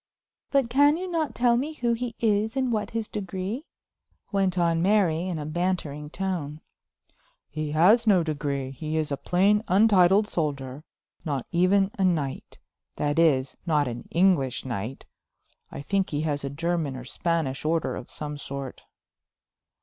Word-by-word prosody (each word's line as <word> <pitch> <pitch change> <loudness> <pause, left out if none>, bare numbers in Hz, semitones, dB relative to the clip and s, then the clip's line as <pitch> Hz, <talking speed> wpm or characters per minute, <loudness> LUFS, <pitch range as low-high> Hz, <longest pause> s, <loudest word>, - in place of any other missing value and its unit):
"But 275 -3 +2
can 285 +5 +4
you 370 +2 -4
not 325 -4 -2
tell 240 -1 +3
me 290 +6 -2
who 240 -5 0
he 235 0 -4
is, 220 +2 +1
and 260 -2 +1
what 215 -2 -1
his 225 -1 -3
degree?" 200 - -5 0.6
went 195 -3 +1
on 170 -1 +2
Mary 185 -3 +2
in 180 -3 -2
a 150 - -5
bantering 155 -3 -2
tone. 165 -5 -3 0.9
"He 155 0 -3
has 210 +9 +5
no 190 -5 +5
degree; 140 -4 -3
he 155 +4 -4
is 155 -2 -1
a - - +1
plain, 200 +7 +2
untitled 195 0 +5
soldier, 140 -5 -3 0.4
not 140 -5 -2
even 190 +3 +3
a - - +2
knight; 155 -7 -1 0.4
that 145 +2 0
is, 140 -5 +3
not 150 -4 +2
an 120 -1 -6
English 170 -9 +2
knight. 120 +1 -5 0.7
I 140 - -7
think 195 +5 0
he 145 0 -2
has 145 -2 -2
a 140 - -2
German 160 -1 -2
or 130 -1 -8
Spanish 160 -1 -2
order 160 +1 0
of - - -8
some 150 -1 -5
sort." 140 -2 -6
170 Hz, 155 wpm, -26 LUFS, 145-205 Hz, 0.9 s, has